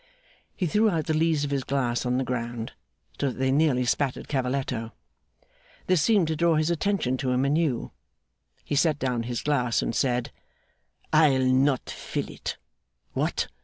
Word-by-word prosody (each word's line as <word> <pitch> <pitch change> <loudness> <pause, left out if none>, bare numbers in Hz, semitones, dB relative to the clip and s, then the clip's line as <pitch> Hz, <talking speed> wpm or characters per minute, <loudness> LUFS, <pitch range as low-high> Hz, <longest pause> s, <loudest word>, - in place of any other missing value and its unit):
He 185 - -1
threw 210 +6 +3
out 165 -6 -1
the 160 - 0
lees 155 -1 +2
of 145 - -2
his 140 -2 0
glass 125 -2 -1
on 125 0 +1
the 130 - +1
ground, 120 -2 -4 0.5
so 140 - +1
that - - -7
they 130 0 +1
nearly 135 -3 +3
spattered 130 +2 -1
Cavalletto. 130 -4 -2 0.9
This 185 -4 +3
seemed 200 0 +3
to 160 - 0
draw 170 +1 +3
his 155 +2 +1
attention 170 -7 0
to 130 -1 -2
him 125 +1 +2
anew. 145 -3 0 0.7
He - - -4
set 150 +1 +3
down 125 -4 -1
his 120 -2 -3
glass 125 -5 +1
and - - -2
said: 125 +2 0 0.8
'I'll 145 -4 +5
not 130 +1 +2
fill - - -4
it. - - -5 0.6
What! - - -1
135 Hz, 165 wpm, -26 LUFS, 125-155 Hz, 0.9 s, I'll